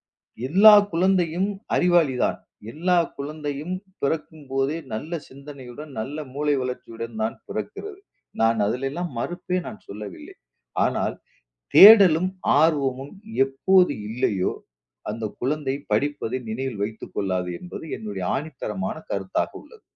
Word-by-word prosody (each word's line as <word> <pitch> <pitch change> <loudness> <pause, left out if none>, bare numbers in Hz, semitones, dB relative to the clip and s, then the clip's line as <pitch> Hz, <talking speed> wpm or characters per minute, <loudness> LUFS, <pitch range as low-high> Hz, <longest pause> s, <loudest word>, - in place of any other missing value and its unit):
எல்லா-எல்லா 185 - +5 0.2
குழந்தையும் 180 +1 +2 0.3
அறிவாளிதான். 170 -8 +2 0.3
எல்லா 175 +6 +1 0.2
குழந்தையும் 150 +3 -4 0.3
பிறக்கும்போதே 140 -1 -2 0.2
நல்ல 145 +10 -5 0.2
சிந்தனையுடன், 140 +1 -10
நல்ல 135 +7 -4 0.2
மூளை 145 +1 +1
வளர்ச்சியுடன் 115 -2 -6
தான் 110 +1 -1
பிறக்கிறது. 410 -2 -6 0.4
நான் 115 0 +3
அதில 125 +6 -1
எல்லாம் 175 +4 -4
மறுப்பே 180 +6 -2
நான் 215 - -9
சொல்லவில்லை. 100 -2 -9 0.5
ஆனால் - - -1 0.6
தேடலும் 190 -5 +9 0.3
ஆர்வமும் 140 -4 +1 0.3
எப்போது 180 +7 +3 0.2
இல்லையோ 110 -5 0 0.6
அந்த 110 +1 -4 0.2
குழந்தை 135 0 -1 0.2
படிப்பதை 145 -4 0
நினைவில் 120 -2 -3
வைத்துக் 110 +1 -6
கொள்ளாது 95 -2 -1
என்பது 175 -2 -8
என்னுடைய 100 -3 -5
ஆணித்தரமான 160 +7 -4 0.2
கருத்தாக - - -1
உள்ளது. 460 -2 -17
145 Hz, 105 wpm, -24 LUFS, 120-175 Hz, 0.6 s, தேடலும்